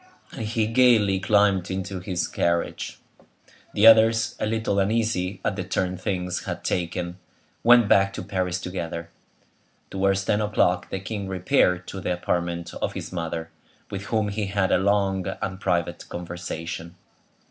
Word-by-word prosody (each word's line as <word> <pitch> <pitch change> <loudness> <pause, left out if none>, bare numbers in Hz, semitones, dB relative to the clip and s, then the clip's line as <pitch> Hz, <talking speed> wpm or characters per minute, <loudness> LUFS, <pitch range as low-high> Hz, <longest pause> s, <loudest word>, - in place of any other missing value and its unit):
And 110 - -5
he 110 0 0
gayly 115 -4 +4
climbed 100 -2 +3
into 95 0 -3
his 90 -1 -2
carriage. 85 0 -1 0.8
The 105 - +4
others, 115 0 +6
a - - 0
little 110 -2 0
uneasy 100 -2 0
at 100 - 0
the 95 - -3
turn 90 0 -1
things 90 -1 -3
had - - -5
taken, 90 0 -2 0.4
went 120 -2 +7
back 100 -1 +4
to - - -5
Paris 90 -1 -2
together. 85 -2 -5 0.8
Towards 95 0 +1
ten 105 - +1
o'clock 100 -4 +1
the 95 - -3
king 100 0 -5
repaired 90 -1 +2
to 95 - -6
the 90 - -1
apartment 85 -1 -2
of - - -1
his - - -6
mother, 85 -2 -4 0.4
with 100 0 -5
whom 110 -1 0
he 100 0 -2
had 100 -1 0
a - - +4
long 95 -1 +1
and 95 -1 -4
private 90 -4 -1
conversation. 85 -1 -6
95 Hz, 150 wpm, -25 LUFS, 90-105 Hz, 0.8 s, went